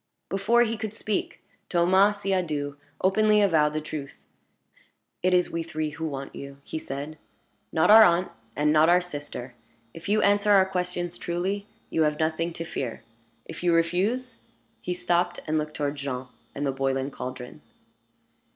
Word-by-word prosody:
Before 230 +5 +3
he 230 -1 -2
could 220 0 -5
speak, 215 -2 -3 0.3
Thomas 190 +4 +3
Siadoux 155 -7 -1 0.3
openly 210 +3 +4
avowed 160 -7 +3
the 155 - 0
truth. 150 -2 -6 1.1
"It 185 - +2
is 180 -1 +3
we 165 - -2
three 155 -2 -3
who 160 +1 -4
want 135 -2 -6
you," 140 0 -9
he 160 - -5
said; 145 +2 -6 0.5
"not 160 +5 +4
our 220 +1 +11
aunt, 175 -1 +3 0.2
and 150 +1 +2
not 155 +1 +5
our 180 +1 +5
sister. 145 -6 -7 0.4
If 165 +4 -8
you 210 +1 +3
answer 205 +1 +3
our 190 -1 +6
questions 180 -2 -3
truly, 190 +4 -2 0.2
you 160 - +1
have 150 -1 +2
nothing 160 +2 0
to 165 - -5
fear. 125 -8 -5 0.4
If 165 - -8
you 175 -1 +3
refuse 200 +9 0 0.2
" - - -41
He 180 - -3
stopped, 175 0 0
and 155 0 +1
looked 150 0 -5
toward 145 0 -2
Jean 130 -2 -4 0.3
and 145 - -2
the 135 - +1
boiling 135 0 -1
caldron. 125 -1 -7
165 Hz, 165 wpm, -26 LUFS, 150-190 Hz, 1.1 s, our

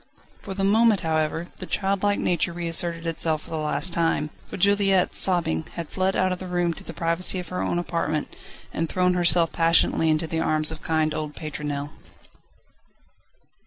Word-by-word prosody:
For 195 - -7
the 195 - -2
moment, 215 +1 +4
however, 160 0 -1
the - - -8
childlike 200 +1 0
nature 170 0 0
reasserted 170 0 0
itself 160 -1 0
for - - -14
the 160 - -2
last 155 +3 +1
time, 165 -2 0 0.2
for - - -7
Juliette, 195 -1 +2
sobbing, 170 -4 +1
had 170 -2 -5
fled 190 0 0
out 185 0 +1
of 180 - -3
the 185 - -7
room, 175 -1 0
to - - -12
the - - -8
privacy 170 +3 0
of 180 -2 -6
her 180 - -3
own - - -1
apartment, 165 -3 -2 0.4
and 165 0 -2
thrown 180 0 +1
herself 175 -2 +3
passionately 165 -1 +3
into 155 +1 +1
the 160 0 -3
arms 155 -1 +2
of 160 - -8
kind 155 -1 0
old 150 -1 -5
Pétronelle. 145 -2 -5
170 Hz, 175 wpm, -24 LUFS, 160-185 Hz, 0.4 s, moment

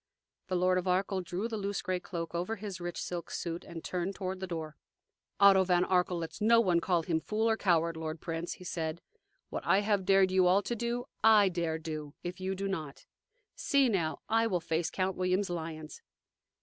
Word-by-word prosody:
The 185 - -1
Lord 185 +1 +3
of 180 - -5
Arkell 190 +1 +1
drew 180 +5 -3
the 225 -2 -4
loose 200 0 -2
gray 185 -1 -1
cloak 170 -2 -5
over 180 +6 -2
his 200 -4 -7
rich 175 0 -4
silk 175 -1 -4
suit, 170 0 -4
and 170 -1 -9
turned 180 +2 -3
toward 190 -1 -4
the 190 - -4
door. 160 -3 -5 0.6
"Otto 195 -1 +7
von 180 -1 +2
Arkell 180 -1 +1
lets 165 +4 -6
no 230 +2 +6
one 180 -6 +3
call 170 -1 +1
him 160 -1 0
fool 215 +6 -1
or 225 - +3
coward, 170 -5 +2
lord 160 0 -5
prince," 165 +1 -4
he - - -12
said. 165 -2 -4 0.5
"What - - -4
I 195 - +3
have 205 -2 +1
dared 195 0 +4
you 185 -1 +4
all 190 +3 +4
to 240 - -2
do, 240 +2 -2 0.2
I 215 -3 +7
dare 170 -3 -1
do, 155 -2 -6
if 175 +1 -5
you 190 +1 -2
do 195 +1 -3
not. 155 -7 -5 0.5
See, 275 -2 +3
now: 170 -7 -1
I 225 +1 +3
will 185 -5 0
face 165 0 -1
Count 185 0 -1
William's 185 +1 0
lions!" 160 -3 -6
185 Hz, 205 wpm, -31 LUFS, 170-195 Hz, 0.6 s, Otto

